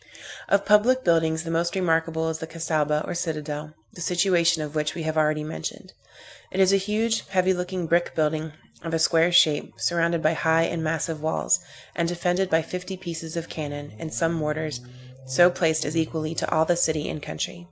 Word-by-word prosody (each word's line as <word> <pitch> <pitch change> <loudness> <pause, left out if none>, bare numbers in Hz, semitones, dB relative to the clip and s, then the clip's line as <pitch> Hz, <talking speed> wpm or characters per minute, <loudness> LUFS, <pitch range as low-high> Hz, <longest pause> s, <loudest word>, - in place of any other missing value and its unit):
Of 200 0 +3
public 225 +6 +4
buildings, 160 -1 +2
the 165 - -4
most 170 +2 0
remarkable 165 -3 +1
is 160 0 -4
the 160 - -6
Cassaubah, 155 -2 -1
or - - -3
citadel, 155 -3 -4 0.2
the 175 - -10
situation 175 -2 +2
of 150 -1 -7
which 150 -1 -1
we 165 - -4
have 155 0 -2
already 155 -1 +2
mentioned. 115 - -6 0.6
It 190 - -3
is 190 0 +5
a - - +6
huge, 215 +3 -1
heavy 190 -1 +2
looking 180 0 -3
brick 170 +2 +1
building, 155 0 0 0.3
of 165 0 -3
a - - +2
square 165 +1 +3
shape, 165 -4 +4
surrounded 170 -1 0
by 155 - +3
high 160 +1 +2
and 165 -1 -2
massive 160 0 -2
walls, 160 +3 +1 0.4
and 170 -1 0
defended 180 +2 0
by 160 -1 +3
fifty 180 +2 -6
pieces 165 -3 -6
of 165 0 -4
cannon, 145 -3 -6
and 160 - -6
some 165 +1 0
mortars, 150 -4 -2 0.5
so 175 +7 +5
placed 160 -3 +1
as 150 +3 -3
equally 160 -1 -1
to - - -2
awe 160 0 +4
the 175 +2 +2
city 160 -3 +1
and 150 - -5
country. 80 - -5
165 Hz, 195 wpm, -25 LUFS, 155-175 Hz, 0.6 s, a